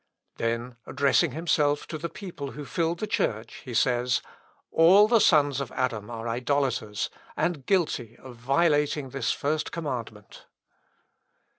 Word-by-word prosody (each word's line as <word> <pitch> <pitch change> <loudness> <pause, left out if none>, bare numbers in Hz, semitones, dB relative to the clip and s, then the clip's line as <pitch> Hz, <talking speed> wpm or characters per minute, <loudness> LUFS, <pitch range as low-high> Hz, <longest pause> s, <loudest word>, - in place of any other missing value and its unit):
Then 115 +1 -2
addressing 140 +1 +2
himself 150 -2 +1
to 155 - -6
the 170 +2 -4
people 165 -9 -7
who 145 0 -7
filled 165 +1 -1
the 215 - -3
church, 110 - -2
he 125 -3 -7
says, 125 +1 +2 0.5
"All 185 +6 +6
the 230 0 +4
sons 145 -6 +4
of 135 - -5
Adam 115 -5 -2
are 115 -1 -5
idolaters, 120 -3 -1 0.3
and 155 -7 -1
guilty 135 - 0
of 130 -2 -12
violating 145 +2 +1
this 130 -1 -1
First 150 +1 -1
Commandment." 120 -10 -6
140 Hz, 135 wpm, -26 LUFS, 120-160 Hz, 0.5 s, All